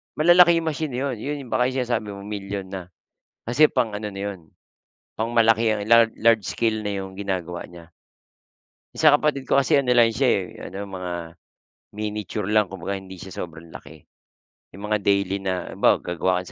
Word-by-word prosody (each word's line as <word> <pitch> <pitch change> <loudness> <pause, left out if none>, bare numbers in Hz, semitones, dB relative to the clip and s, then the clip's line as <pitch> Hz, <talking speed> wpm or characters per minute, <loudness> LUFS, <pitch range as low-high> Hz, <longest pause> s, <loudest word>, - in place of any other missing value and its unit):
Malalaki 170 +1 +6
yung 165 - -1
machine 155 -2 -4
na 125 - -2
'yon 135 -3 -2
'yon 140 +1 -5
baka 125 - +2
yung 130 - -4
sinasabi 120 -3 -2
mo 100 - -9
milyon 100 -1 -5
na. 95 -2 -5 0.6
Kasi 125 +6 +5
pang-ano 110 -6 -2
na 100 - -6
yun, 85 -5 -14 0.7
pang-malaking 110 -2 +2
pang 115 -1 +6
large 115 -2 +4
scale 110 +1 -1
na 105 - -1
yung 95 0 -8
ginagawa 95 -4 -4
niya. 85 -1 -14 1.0
Sa 155 -2 +5
kapatid 145 -2 +2
ko 135 - +3
kasi 135 0 +2
ano 135 -3 +2
lang 115 -2 +4
siya - - +2
eh, - - 0 0.3
ano 100 +2 -6
mga, 90 -2 -5 0.8
miniture 105 -1 -4
lang 105 -1 +3
kumbaga 95 +1 -5
hindi 95 0 -11
siya 95 - -9
sobrang 80 0 -14
laki. 75 +2 -12 0.7
'Yong 100 - -10
mga 105 0 +1
daily 100 -1 +1
na, 95 -2 -3
halimbawa - - +3
gagawa 90 +1 -1
ka - - -13
105 Hz, 175 wpm, -23 LUFS, 95-125 Hz, 1.0 s, Malalaki